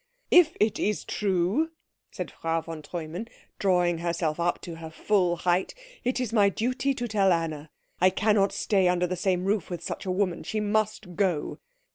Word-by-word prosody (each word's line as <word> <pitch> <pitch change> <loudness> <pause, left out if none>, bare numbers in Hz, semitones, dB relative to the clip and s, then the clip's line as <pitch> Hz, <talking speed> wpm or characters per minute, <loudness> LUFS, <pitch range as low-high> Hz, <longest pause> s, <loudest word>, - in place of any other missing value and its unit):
"If 345 -3 +6
it 210 0 +2
is 210 +1 -1
true," 200 - +1 0.4
said - - -6
Frau 165 0 -1
von 160 -1 -7
Treumann, 170 +6 -6 0.3
drawing 180 -3 +2
herself 170 -2 -1
up 170 +1 +1
to 170 -2 -7
her 160 -1 -8
full 180 +1 +1
height, 175 - 0 0.3
"it 250 +1 0
is 245 -4 -2
my 205 -3 +5
duty 255 +6 -1
to 245 -1 -3
tell 200 -3 +3
Anna. 160 -3 -1 0.3
I 185 - +6
cannot 200 +1 +2
stay 195 -3 +2
under 180 0 +2
the 180 +1 -2
same 180 0 0
roof 200 -1 0
with 175 -2 -5
such - - -5
a - - +1
woman. 185 -2 0
She 220 - -3
must 210 -3 -1
go." 180 -6 0
185 Hz, 180 wpm, -27 LUFS, 170-210 Hz, 0.4 s, If